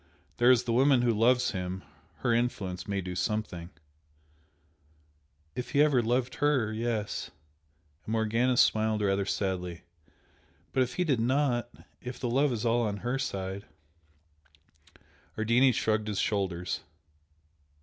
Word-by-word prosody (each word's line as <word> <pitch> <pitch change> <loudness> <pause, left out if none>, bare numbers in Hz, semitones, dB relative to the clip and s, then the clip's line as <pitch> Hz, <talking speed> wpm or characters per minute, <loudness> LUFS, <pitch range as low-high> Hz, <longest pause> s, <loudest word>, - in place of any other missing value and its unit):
There 120 +1 +5
is 125 -2 +5
the 115 -1 -1
woman 130 0 +4
who 120 - +3
loves 125 +3 +3
him 95 -2 -4 0.4
her 120 -2 +2
influence 100 -7 -1
may 100 -1 -1
do 90 0 -5
something 90 -4 -2 0.9
" 75 -1 -38
"If 125 - -5
he 145 0 +6
ever 140 -5 +3
loved 120 +2 0
her 135 -7 +2
yes" 110 -2 -2 0.7
and - - -6
Morgana 115 +3 +1
smiled 110 -2 +3
rather 100 0 +1
sadly 90 -4 -2 0.9
"But 130 - +2
if 130 0 -1
he 180 - +1
did 140 -8 +1
not 125 0 +1 0.3
if 125 0 -7
the 120 -2 -2
love 140 +3 +3
is 115 -1 -2
all 120 +1 +3
on 105 -3 -1
her 125 +2 0
side 95 -5 -4 0.8
" 75 +1 -30
Ardini 120 +4 +4
shrugged 110 -2 0
his 105 -2 -2
shoulders. 95 -4 -1
110 Hz, 140 wpm, -29 LUFS, 95-125 Hz, 0.9 s, he